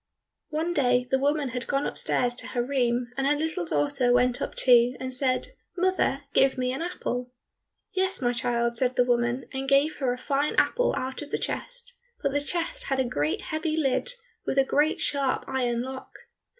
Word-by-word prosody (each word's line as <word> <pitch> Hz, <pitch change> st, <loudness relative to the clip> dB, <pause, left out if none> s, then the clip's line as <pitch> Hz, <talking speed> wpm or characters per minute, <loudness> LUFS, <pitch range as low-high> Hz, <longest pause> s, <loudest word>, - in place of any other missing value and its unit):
One 325 Hz, +2 st, -1 dB
day 250 Hz, -4 st, +2 dB
the 265 Hz, -, +3 dB
woman 285 Hz, 0 st, +1 dB
had 250 Hz, +1 st, -4 dB
gone 280 Hz, 0 st, 0 dB
upstairs 245 Hz, -1 st, +1 dB
to -, -, -4 dB
her 240 Hz, -2 st, -1 dB
room, 245 Hz, -2 st, 0 dB
and 270 Hz, 0 st, +1 dB
her 290 Hz, -, +4 dB
little 320 Hz, +4 st, -2 dB
daughter 280 Hz, -5 st, +1 dB
went 245 Hz, 0 st, +3 dB
up -, -, -3 dB
too, 245 Hz, 0 st, +5 dB
and 260 Hz, 0 st, -4 dB
said, 255 Hz, 0 st, +1 dB, 0.3 s
"Mother, 365 Hz, -6 st, +1 dB
give 270 Hz, 0 st, +4 dB
me 255 Hz, 0 st, 0 dB
an 270 Hz, -, -4 dB
apple." 250 Hz, -8 st, -3 dB, 0.6 s
"Yes, 380 Hz, 0 st, +1 dB
my 245 Hz, -2 st, +1 dB
child," 235 Hz, -1 st, 0 dB
said 255 Hz, -1 st, +1 dB
the 245 Hz, -, +4 dB
woman, 240 Hz, +1 st, +1 dB
and 270 Hz, 0 st, -3 dB
gave 280 Hz, +3 st, +3 dB
her 260 Hz, -3 st, 0 dB
a 250 Hz, -, -2 dB
fine 285 Hz, +3 st, 0 dB
apple -, -, +2 dB
out 260 Hz, +2 st, -4 dB
of 295 Hz, -, -7 dB
the -, -, -1 dB
chest, -, -, -5 dB, 0.2 s
but 280 Hz, -, +1 dB
the 290 Hz, +1 st, 0 dB
chest 350 Hz, -, -3 dB
had 270 Hz, -1 st, -1 dB
a 260 Hz, -, +2 dB
great 150 Hz, -9 st, -1 dB
heavy 315 Hz, 0 st, -2 dB
lid 290 Hz, -, +1 dB, 0.3 s
with -, -, -2 dB
a 270 Hz, -, +6 dB
great 295 Hz, +3 st, +2 dB
sharp 275 Hz, -2 st, 0 dB
iron 245 Hz, -3 st, 0 dB
lock. 260 Hz, 0 st, -7 dB
265 Hz, 195 wpm, -27 LUFS, 250-300 Hz, 0.6 s, a